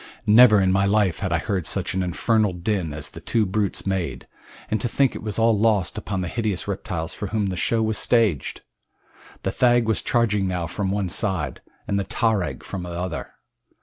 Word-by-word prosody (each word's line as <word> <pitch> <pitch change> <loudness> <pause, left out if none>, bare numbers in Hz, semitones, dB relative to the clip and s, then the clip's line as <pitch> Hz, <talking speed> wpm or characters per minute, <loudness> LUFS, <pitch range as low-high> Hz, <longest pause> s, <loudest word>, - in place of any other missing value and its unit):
Never 110 0 +7
in 95 -1 +3
my 100 +1 +3
life 100 -4 +2
had 95 -5 -2
I 85 - +3
heard 90 0 -2
such - - -2
an 95 - 0
infernal 105 +3 +1
din 90 -2 -2
as 75 +1 -5
the - - -10
two 110 -2 0
brutes 100 +1 -2
made, 95 -3 -2 0.5
and 110 -2 0
to - - 0
think 135 +2 +2
it - - -6
was 105 -2 -5
all 115 0 +4
lost 105 -3 +1
upon 100 -3 -3
the 90 - -3
hideous 105 -1 -2
reptiles 85 -4 -4
for 105 - -5
whom 105 +1 -1
the 95 -1 -2
show 110 +5 +1
was 110 -1 0
staged! 110 - +1 0.8
The 95 - 0
thag 120 +1 +3
was 110 - +1
charging 105 -5 +1
now 90 -2 -2
from 95 +4 -3
one 100 -1 -1
side, 85 - -1 0.3
and 100 - 0
the - - 0
tarag 105 -2 -1
from 95 - -5
the 90 - -6
other. 85 -2 -5
100 Hz, 205 wpm, -23 LUFS, 90-110 Hz, 0.8 s, Never